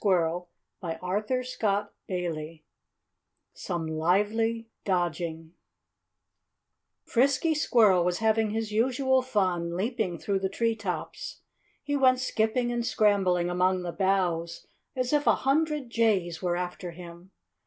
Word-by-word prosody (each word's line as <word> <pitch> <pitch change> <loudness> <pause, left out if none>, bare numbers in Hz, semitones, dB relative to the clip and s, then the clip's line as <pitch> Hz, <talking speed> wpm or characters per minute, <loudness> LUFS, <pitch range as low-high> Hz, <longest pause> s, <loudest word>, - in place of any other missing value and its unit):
[Illustration: 175 -3 +1 0.3
"The 205 +5 -1 0.2
Picnic"] 180 -2 -2
V 155 +1 -8 0.9
Some 170 -2 -4
Lively 210 +8 +1 0.2
Dodging 170 -3 -2 1.5
Frisky 275 +6 +2
Squirrel 220 - +4
was 180 0 0
having 220 0 +2
his 220 0 -3
usual 260 +4 +2
fun, 180 -8 -1
leaping 210 -4 -1
through 195 +3 -1
the 190 0 -1
tree 230 +3 0
tops. 210 - -5 0.4
He 290 0 -1
went 260 -2 +4
skipping 240 0 0
and 240 0 -1
scrambling 195 -6 +2
among 185 +1 +1
the 175 - -3
boughs 180 -3 0 0.3
as 255 +1 -1
if 295 0 +2
a - - +6
hundred 295 -2 +1
jays 195 -8 +1
were 175 -2 0
after 180 0 -4
him. 175 +1 -11
200 Hz, 120 wpm, -28 LUFS, 175-235 Hz, 1.5 s, a